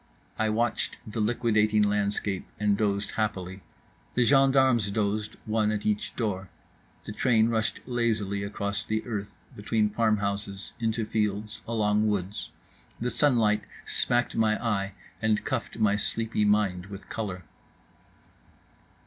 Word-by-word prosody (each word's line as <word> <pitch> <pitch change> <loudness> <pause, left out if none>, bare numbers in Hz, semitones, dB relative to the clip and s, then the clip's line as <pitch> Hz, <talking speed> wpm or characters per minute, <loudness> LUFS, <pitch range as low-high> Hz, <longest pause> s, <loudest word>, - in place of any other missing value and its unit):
I 110 0 +2
watched 115 +2 0
the 110 +1 -5
liquidating 110 -1 +3
landscape 100 -1 0
and 105 -1 +3
dozed 100 -1 0
happily. 95 -3 -2 0.5
The 125 - +4
gendarmes 130 -5 +4
dozed, 105 0 -1
one 110 -1 +1
at 105 -1 -3
each 105 -1 -1
door. 95 -5 -2 0.5
The - - -7
train 115 -2 +3
rushed 110 -1 0
lazily 110 -5 0
across 100 0 -2
the 110 0 -2
earth, 100 -4 -5 0.2
between 105 0 +1
farmhouses, 100 -3 -1
into 115 -1 0
fields, 105 0 -1
along 105 -2 +2
woods… 100 -1 -2 0.5
the 125 +2 -1
sunlight 110 -5 +3 0.2
smacked 120 0 +1
my 110 -1 +3
eye 100 -3 0 0.3
and 110 -1 +1
cuffed 130 -5 -3
my 105 -2 +3
sleepy 110 0 0
mind 100 -3 +2
with 100 0 -9
colour. 95 -5 -4
105 Hz, 125 wpm, -28 LUFS, 100-115 Hz, 0.5 s, The